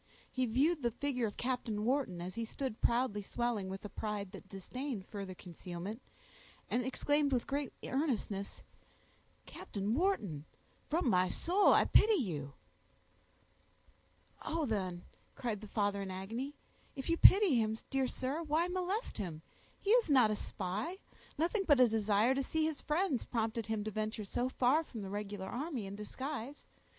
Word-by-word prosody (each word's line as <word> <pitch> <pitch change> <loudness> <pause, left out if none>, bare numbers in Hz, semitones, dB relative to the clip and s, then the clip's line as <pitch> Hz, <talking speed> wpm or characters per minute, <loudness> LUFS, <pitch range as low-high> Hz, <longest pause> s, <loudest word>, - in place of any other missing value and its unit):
He 255 -1 0
viewed 285 +8 +2
the 240 - +2
figure 250 -1 -1
of 205 - -8
Captain 240 -4 -1
Wharton, 245 -9 0
as 185 +1 -5
he 230 - -3
stood 230 0 -4
proudly 235 -3 +2
swelling 220 -2 -2
with 195 +2 -6
a - - -5
pride 205 -3 -4
that 195 -1 -11
disdained 215 +3 -5
further 195 -3 -6
concealment, 180 +5 -7 0.7
and 250 - +2
exclaimed 290 +3 +1
with 250 -3 +1
great 280 -1 -2
earnestness,— 235 -8 -2 0.8
"Captain 205 +1 -3
Wharton, 225 - 0 0.4
from 320 -1 +1
my 185 -4 +4
soul 370 - +4
I - - +6
pity 435 0 +6
you!" 155 - -2 1.9
"Oh! 325 -1 -1
then," 185 -7 -2 0.3
cried 220 -5 -3
the 215 - -8
father 205 -1 0
in 195 - -4
agony, 225 +10 -4 0.4
"if 270 - -5
you 335 - +3
pity 390 0 +8
him, 220 -1 +1
dear 270 -1 +2
sir, 265 +6 -2
why 320 +2 +1
molest 370 - -2
him? 165 -6 -4 0.4
He 405 - 0
is 475 -6 +5
not 255 -6 +6
a - - +1
spy; 205 - -3 0.4
nothing 350 +7 +1
but 290 -4 +6
a 250 - +8
desire 220 +2 +3
to 270 - 0
see 315 +4 0
his 315 -3 -2
friends 300 -4 +1
prompted 225 -1 -2
him 220 -2 -1
to 215 - -3
venture 215 +1 -3
so 245 +5 -1
far 260 +5 +3
from 230 -9 -7
the 195 - -6
regular 205 -1 -4
army 255 - -3
in 195 - -6
disguise. 265 +5 -5
235 Hz, 160 wpm, -34 LUFS, 205-285 Hz, 1.9 s, pity